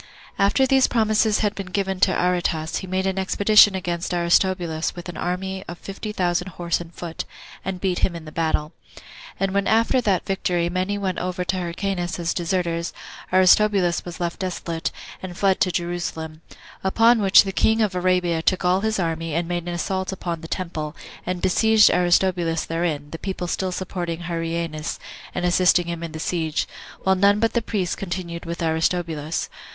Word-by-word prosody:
1. 195 - +4
After 265 +6 +3
these 265 0 +4
promises 215 -2 +2
had 210 -1 +1
been 195 -2 -6
given 190 0 -2
to 185 - +4
Aretas, 175 -3 0
he 190 - -5
made 185 +1 -1
an 190 0 0
expedition 205 +1 +5
against 175 -1 -2
Aristobulus 170 -1 +1
with 175 0 -8
an 175 - -7
army 190 +3 -3
of 175 - -7
fifty 200 +3 -6
thousand 180 -2 0
horse 170 -1 -1
and 170 -1 -10
foot, 170 -1 -6 0.4
and 190 -1 -4
beat 185 -1 0
him 175 - +1
in 165 -1 -8
the 155 - -9
battle. 155 -1 -1 0.7
And 195 -1 0
when 200 0 +1
after 230 +3 +3
that 195 -6 +1
victory 175 -3 0
many 185 +3 -1
went 190 -3 -2
over 180 0 -2
to 185 - -1
Hyrcanus 175 0 -2
as 170 -1 -1
deserters, 170 -1 -1 0.4
Aristobulus 185 -1 +4
was 175 -1 -8
left 170 -1 -3
desolate, 170 -3 -3 0.3
and 180 -2 -7
fled 195 -2 +2
to 185 - +2
Jerusalem; 170 -3 -4 0.4
upon 225 +4 +4
which 195 -1 +7
the 195 - -3
king 220 +3 +2
of 205 -3 0
Arabia 180 -2 +1
took 185 +2 +1
all 180 +2 +3
his 220 0 0
army, 165 -3 -2
and 170 0 0
made 175 0 -3
an 175 - -2
assault 190 +2 -2
upon 170 -3 -4
the 165 - -8
temple, 160 -4 -4 0.3
and 180 -1 -3
besieged 220 +3 +5
Aristobulus 175 -2 +2
therein, 165 -3 -2
the 165 - -6
people 190 -2 -4
still 185 +1 -2
supporting 175 -2 -4
Hyrcanus, 165 -2 -3 0.4
and 180 - -1
assisting 180 0 +4
him 170 -1 -4
in 165 -1 -5
the 160 - -6
siege, 160 -2 -1 0.3
while 190 - +3
none 200 +2 +4
but 225 +1 +1
the 235 - +2
priests 200 -5 -2
continued 175 -3 -5
with 170 +1 -4
Aristobulus. 160 -1 -1
180 Hz, 180 wpm, -23 LUFS, 170-190 Hz, 0.7 s, which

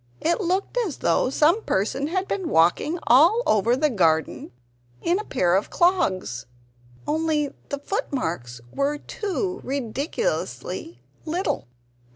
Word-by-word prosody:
It 340 +6 +1
looked 380 +6 0
as 390 - -2
though - - +2
some 310 +10 +3
person 265 - -1
had 375 +4 -1
been 375 -5 -2
walking 175 - +3
all 335 - +5
over 220 +3 +3
the 295 +2 +1
garden 160 -7 +1 0.5
in 350 +3 +1
a - - -4
pair 180 - +1
of 195 - 0
clogs 190 - +1 0.6
only 305 -1 0 0.2
the 285 - -2
footmarks 170 - -3
were 280 +1 0
too 385 +2 -3
ridiculously 280 - -3 0.2
little! 350 - -2
295 Hz, 125 wpm, -24 LUFS, 225-365 Hz, 0.6 s, all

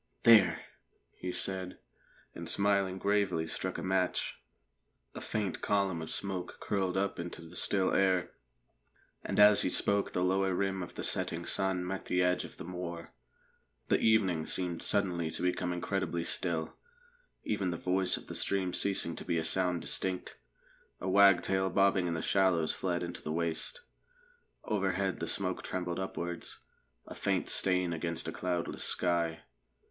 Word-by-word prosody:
"There!" 115 -2 +7 0.6
he 90 - -5
said, 95 0 -1 0.6
and - - -7
smiling 100 -2 +2
gravely 100 -4 +1
struck 95 +3 -4
a - - -5
match. 95 -1 -1 0.7
A - - -7
faint 105 -4 -3
column 100 -4 0
of 80 - -6
smoke 95 -2 -4
curled 95 -2 -1
up 100 -1 -1
into 85 -1 -6
the 85 +2 -13
still 95 +2 +1
air, 95 -2 +2 0.9
and - - -2
as 105 0 +8
he - - +1
spoke 100 +2 +2
the 90 - 0
lower 95 0 +1
rim 95 0 -1
of 90 - -7
the - - -5
setting - - 0
sun 95 -2 +1
met 95 +1 -4
the 90 0 +1
edge 90 0 +1
of - - -11
the - - -7
moor. 85 -1 -6 0.8
The - - +3
evening 95 -8 +2
seemed 90 -3 -1
suddenly 90 -5 0
to - - -4
become 90 0 0
incredibly 85 -1 -2
still, 85 -3 0 0.7
even 100 -4 -1
the 85 - -3
voice 90 +1 +1
of - - -10
the - - -8
stream 95 -2 0
ceasing 95 -4 0
to - - -6
be 85 -2 -1
a 80 - -1
sound 90 0 +1
distinct. 95 -1 -1 0.6
A 90 - -5
wagtail 95 -1 +4
bobbing 95 -1 +3
in 85 - -1
the 80 - -3
shallows 95 -5 +2
fled 90 -2 -2
into 85 0 -6
the 75 - -4
waste. 85 - -2 0.8
Overhead 95 -2 -1
the - - -3
smoke - - -1
trembled 90 -1 -3
upwards, 85 -2 -5 0.5
a - - -9
faint - - 0
stain 90 -2 +3
against 85 0 -3
a - - -2
cloudless 90 -2 -2
sky. 85 -2 0
90 Hz, 160 wpm, -31 LUFS, 85-95 Hz, 0.9 s, as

